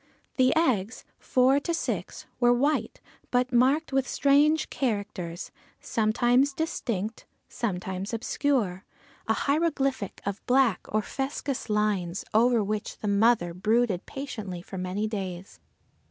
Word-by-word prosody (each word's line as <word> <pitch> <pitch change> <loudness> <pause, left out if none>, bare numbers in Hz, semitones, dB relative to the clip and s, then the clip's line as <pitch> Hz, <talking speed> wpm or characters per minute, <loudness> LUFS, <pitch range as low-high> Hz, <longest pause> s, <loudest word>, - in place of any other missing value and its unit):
The 255 -1 +5
eggs, 250 - +1
four 260 +2 +3
to 335 +4 -2
six, - - -4
were 240 -1 +5
white, 285 +5 0 0.3
but 250 +1 +1
marked 270 +5 +3
with 265 -2 +1
strange 295 +3 +3
characters, 200 -8 -3 0.3
sometimes 240 +5 +2
distinct, 230 - -3 0.2
sometimes 190 -2 -3
obscure, 230 -5 -1 0.4
a 220 - +3
hieroglyphic 280 - 0
of 200 +1 -4
black 250 -6 +3
or 215 0 0
fuscous 270 -1 -4
lines, 205 -4 0
over 230 0 +4
which 210 +1 -3
the 215 - -5
mother 200 -3 +3
brooded 215 0 +1
patiently 215 -10 -6
for 190 - -7
many 185 +3 -2
days. 190 -3 -6
230 Hz, 120 wpm, -27 LUFS, 200-270 Hz, 0.4 s, The